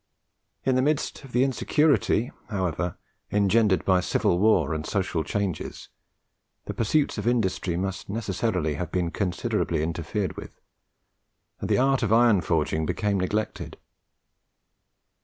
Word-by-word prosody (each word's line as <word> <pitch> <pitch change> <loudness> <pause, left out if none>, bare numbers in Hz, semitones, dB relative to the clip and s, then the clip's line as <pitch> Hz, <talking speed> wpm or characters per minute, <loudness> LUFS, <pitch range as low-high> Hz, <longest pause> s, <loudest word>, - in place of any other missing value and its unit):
In 130 - +3
the 130 - +3
midst 150 +1 -1
of 135 - -12
the 125 +1 +3
insecurity, 135 -2 +2 0.2
however, 90 -3 -2 0.3
engendered 105 -1 +3
by 95 -1 +4
civil 85 0 +1
war 90 -8 +3
and 80 -1 -3
social 90 -3 -1
changes, 95 +1 -3 0.8
the - - -4
pursuits 140 +6 +1
of - - -3
industry 95 -7 0
must 95 +1 -4
necessarily 100 -6 -1
have 80 +2 -4
been 90 -2 -1
considerably 85 -4 -1
interfered 85 +3 -3
with, - - -10 1.0
and - - -4
the - - +3
art 135 0 +3
of 110 -3 0
iron 115 -4 +5
forging 80 -2 0
became 100 -2 0
neglected. 105 +4 -3
100 Hz, 130 wpm, -26 LUFS, 85-115 Hz, 1.0 s, iron